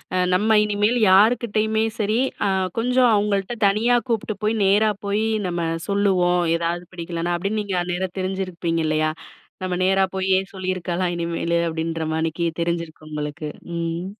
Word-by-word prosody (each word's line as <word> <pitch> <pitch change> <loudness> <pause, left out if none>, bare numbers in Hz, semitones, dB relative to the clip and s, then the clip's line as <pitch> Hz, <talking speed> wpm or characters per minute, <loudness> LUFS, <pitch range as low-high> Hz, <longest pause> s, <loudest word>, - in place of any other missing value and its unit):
அ, - - +2 0.2
"நம்ம 215 +4 +3
இனிமேல் 210 +3 +1
யாருக்கிட்டயுமே 220 +1 +3 0.2
சரி, 215 +2 +1 0.3
அ - - +2 0.3
கொஞ்சம் 250 +2 +3
அவங்கள்ட்ட 205 +1 0
தனியா 220 +5 +3
கூப்பிட்டு 220 -2 -1
போயி, 215 +1 +1
நேரா 210 +3 +4
போயி 205 +2 0 0.2
நம்ம 175 -1 -2 0.3
சொல்லுவோம். 185 -3 +2 0.2
ஏதாவது 170 +1 -2
பிடிக்கலைன்னா" 170 0 -3
அப்படின்னு 200 +4 -1
நீங்க 185 -3 -1
நேரா 185 +1 -2
தெரிஞ்சிருப்பீங்க 185 -3 -2
இல்லையா? 155 0 +1 0.5
நம்ம 185 -1 -2
நேரா 195 +1 +3
போயே 190 0 +2
சொல்லியிருக்கலாம் 185 -1 -2
இனிமேலு, 170 0 -1
அப்படின்ற 165 0 -3
மானிக்கி, 165 +1 -1 0.2
தெரிஞ்சிருக்கும் 170 -2 -3
உங்களுக்கு. 150 +1 -4 0.3
ம். 170 +1 -3
185 Hz, 135 wpm, -22 LUFS, 170-210 Hz, 0.5 s, நேரா